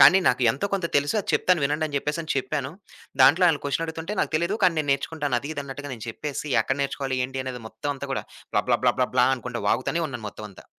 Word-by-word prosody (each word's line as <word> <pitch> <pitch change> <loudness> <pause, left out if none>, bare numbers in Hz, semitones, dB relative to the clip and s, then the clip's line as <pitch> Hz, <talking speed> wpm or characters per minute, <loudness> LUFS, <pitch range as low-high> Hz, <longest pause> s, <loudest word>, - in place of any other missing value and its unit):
కానీ 190 - +9
నాకు 125 +1 +1
ఎంతో 135 - -2
కొంత 190 -4 +1
తెలుసు, 145 +5 +1
అది - - -12
చెప్తాను 180 -3 +3
వినండి 150 +3 0
అని 145 -2 -4
చెప్పేసి 150 +3 -3
చెప్పాను. 140 0 -2 0.5
దాంట్లో 160 +8 +7
ఆల్లు 155 -3 +1
క్వశ్చన్ 145 +3 0
అడుగుతుంటే, 160 +5 -5
నాకు - - -1
తెలీదు. 170 +6 0
కానీ 175 -2 +4
నేను 150 - -1
నేర్చుకుంటాను, 145 -2 -1
అది, 145 - -6
ఇది 145 - -3
అన్నట్టుగా 140 +1 -7
నేను 115 -2 -9
చెప్పేసి, 145 +5 -4 0.2
ఎక్కడ 135 - -1
నేర్చుకోలి, 135 -1 -2
ఏంటి 130 0 -5
అనేది 125 -2 -5
మొత్తం 145 +7 -4
అంతా 140 0 -7
కూడా, - - -2 0.3
బ్లా, - - +3 0.4
బ్లా, - - +2
బ్లా 125 - +6
అనుకుంటా 125 -1 -5
వాగుతూనే 165 +6 0
ఉన్నాను 120 -5 -7
మొత్తం 105 - -8
అంతా. 95 - -16
140 Hz, 220 wpm, -25 LUFS, 130-160 Hz, 0.5 s, కానీ